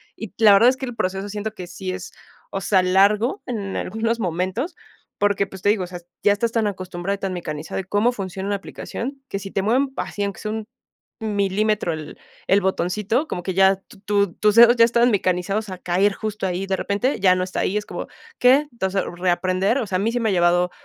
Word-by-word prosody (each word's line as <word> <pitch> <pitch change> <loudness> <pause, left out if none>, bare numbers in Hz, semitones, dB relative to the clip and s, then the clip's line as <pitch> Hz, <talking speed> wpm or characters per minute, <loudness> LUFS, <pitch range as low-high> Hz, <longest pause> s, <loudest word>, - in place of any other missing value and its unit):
y 220 - -7
la 215 -3 +7
verdad 230 +5 +7
es 260 - 0
que 265 - -4
el 245 -2 -7
proceso 190 -1 -2
siento 210 +1 -4
que 180 - -7
sí 185 +1 -5
es, 185 -1 -7 0.4
o 195 - -3
sea, 185 0 +3
largo 205 - +3
en 205 -5 -4
algunos 225 +3 -1
momentos, 185 - -2 0.4
porque, 205 -1 +1
pues, 190 -1 -11
te 205 - +3
digo, 205 -3 +2
o - - -11
sea, 180 0 -8 0.2
ya 205 - +4
estás 225 +3 -1
tan 225 -2 +1
acostumbrado 185 0 -3
y - - -10
tan 195 -2 -3
mecanizado, 155 -1 -5
y - - -3
cómo 205 +6 +2
funciona 195 -3 -5
una 205 - 0
aplicación, 270 +7 -7
que 195 - -3
si 195 0 -7
te 195 - 0
mueven 260 +6 +2
así 205 - -3
aunque 200 -3 -3
sea 215 - -4
un 220 -1 -4 0.5
milímetro 205 -3 0
el 155 -1 -8 0.3
el 200 +1 +4
botoncito, 200 - 0
como 175 - -4
que 190 - -2
ya 190 +1 +5 0.3
tu 200 -3 +1
tus 210 -1 +2
dedos 235 +1 +8
ya 230 - +7
estaban 235 +1 +3
mecanizados 195 +2 0
a 185 - -6
caer 185 +3 +1
justo 210 -2 -3
ahí, 185 +2 -2
de 195 - 0
repente 205 +8 -1
ya 185 -1 +5
no 185 - 0
está 185 - -4
ahí, 200 - 0
es 210 - -3
como, - - -6 0.3
¿qué?, 270 +4 +5
entonces, 195 -4 -1
reaprender, 185 +4 +1
o 255 - -1
sea, 185 -1 0
a - - -2
mí 220 +4 +1
sí 245 - -1
me 225 -2 +1
ha - - +1
llevado 175 0 +3
200 Hz, 225 wpm, -22 LUFS, 185-220 Hz, 0.5 s, dedos